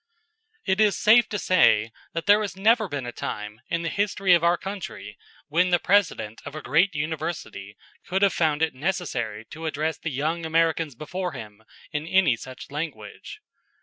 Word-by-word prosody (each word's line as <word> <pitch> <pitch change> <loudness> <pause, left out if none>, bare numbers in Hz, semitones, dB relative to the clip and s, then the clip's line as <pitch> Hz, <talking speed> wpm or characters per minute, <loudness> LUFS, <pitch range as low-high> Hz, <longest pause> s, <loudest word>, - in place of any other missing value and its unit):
It 190 +1 +2
is 210 -4 +3
safe 225 +3 +5
to 205 - -2
say 115 - +3 0.2
that 165 - -3
there 205 +1 +6
has 200 -2 -4
never 220 +2 +3
been 145 -6 -4
a 120 - -4
time 105 -1 -6
in 170 0 -1
the 165 - -1
history 195 0 +2
of 170 -1 +4
our 170 +1 +4
country 195 0 -7 0.3
when 180 +4 +2
the 175 - +4
President 175 - +1
of 145 - -8
a 155 - -5
great 165 +4 +2
university 150 - -4 0.3
could 190 +2 0
have 200 - +4
found 155 -2 +1
it 160 - +1
necessary 130 - -3
to 160 +1 -6
address 155 +1 -2
the 165 - -3
young 155 +4 -2
Americans 160 -3 +1
before 180 +6 -4
him 105 0 -10 0.3
in 150 +1 -3
any 185 -8 +4
such 130 +3 -10
language. 140 -9 -7
165 Hz, 180 wpm, -25 LUFS, 140-190 Hz, 0.3 s, there